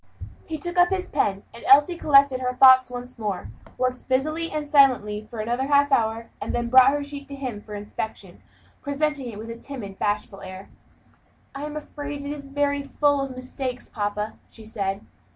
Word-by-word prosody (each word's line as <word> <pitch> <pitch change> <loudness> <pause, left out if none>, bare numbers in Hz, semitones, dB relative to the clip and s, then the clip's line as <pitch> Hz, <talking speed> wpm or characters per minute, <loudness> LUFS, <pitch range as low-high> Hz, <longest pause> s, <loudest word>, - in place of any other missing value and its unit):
He 320 - -4
took 350 +3 -3
up 355 0 +6
his 375 -1 -2
pen, 195 0 0
and 235 - -11
Elsie 290 +6 +6
collected 275 -5 +4
her 250 0 -1
thoughts 260 0 +7
once 245 0 -8
more, 200 - -4 0.3
worked 255 0 -2
busily 310 +6 0
and 300 -1 -4
silently 245 -8 +3
for 225 -2 -5
another 240 +4 -1
half 285 0 +4
hour, 225 -2 +1
and - - -3
then 240 0 -1
brought 260 0 +8
her 290 +1 -1
sheet 285 0 -8
to 280 - -7
him 255 -7 -5
for 210 0 -9
inspection; 210 +1 -7 0.4
presenting 285 -2 -1
it 205 - -9
with 225 +2 -7
a - - -6
timid, 230 -7 -8
bashful 205 -1 -2
air, 190 0 -9 0.8
"I 275 +1 -5
am 300 0 -5
afraid 290 -1 -6
it 285 - -3
is 285 -1 -7
very 285 0 0
full 285 0 +1
of 270 -2 -4
mistakes, 255 0 -5
papa," 210 0 -3
she 220 - -14
said. 200 -3 -3
260 Hz, 190 wpm, -24 LUFS, 220-285 Hz, 0.8 s, brought